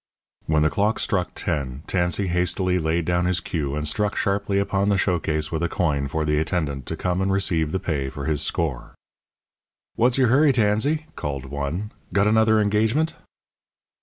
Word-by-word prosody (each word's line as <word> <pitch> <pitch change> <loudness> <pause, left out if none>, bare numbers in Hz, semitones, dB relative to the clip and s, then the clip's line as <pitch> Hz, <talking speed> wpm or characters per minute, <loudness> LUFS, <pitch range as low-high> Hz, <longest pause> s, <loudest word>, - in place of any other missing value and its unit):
When 75 -1 +3
the 75 - +2
clock 105 +2 +1
struck 90 -5 -1
ten, 70 -1 -3
Tansey 90 +2 0
hastily 90 +1 0
laid 80 +1 0
down 90 +1 +1
his 90 -1 +1
cue 75 -5 -3
and 75 0 -2
struck 105 +6 0
sharply 100 -1 0
upon 100 0 +1
the 100 - +3
show 90 -1 +1
case 75 0 -2
with 80 -1 -2
a 85 - 0
coin 75 -6 0
for 75 +2 -2
the 75 0 +1
attendant 75 -5 -2
to - - -4
come 90 0 -1
and 95 0 +1
receive 85 -6 +1
the 95 - 0
pay 70 -7 -2
for 70 -1 -6
his 75 -1 +1
score. 75 -7 -2 1.0
"What's 120 +2 +2
your 130 -3 +4
hurry, 140 +3 +5
Tansey?" 125 +8 +1
called 70 -2 -4
one. 70 - -4 0.2
"Got 100 0 +3
another 110 0 +4
engagement?" 110 +9 +1
90 Hz, 180 wpm, -23 LUFS, 75-105 Hz, 1.0 s, hurry